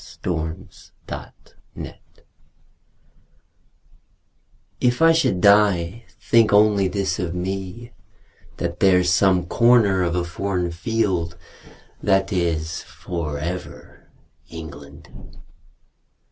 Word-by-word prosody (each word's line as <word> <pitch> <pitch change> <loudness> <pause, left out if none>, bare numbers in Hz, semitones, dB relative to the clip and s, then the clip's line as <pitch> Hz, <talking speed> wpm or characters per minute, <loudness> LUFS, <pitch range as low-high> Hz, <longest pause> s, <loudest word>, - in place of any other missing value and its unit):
V. - - -15
The 80 0 -3 0.5
Soldier - - -10 2.8
If 125 0 +1
I 165 0 +6
should 160 - +1
die, 100 0 +3
think 115 -2 +3
only 105 -1 +4
this 95 -2 -2
of 90 -1 -3
me: 95 +5 -5 0.6
That 85 0 -4
there's 90 -2 +4
some 90 -1 +3
corner 110 -2 +4
of 85 -1 0
a 90 - 0
foreign 90 0 -2
field 90 -3 -1 0.6
That 95 -1 +1
is 85 -3 -1
for 80 -5 -5
ever 85 +5 -7 0.4
England. 70 -3 -12
90 Hz, 90 wpm, -22 LUFS, 85-100 Hz, 2.8 s, I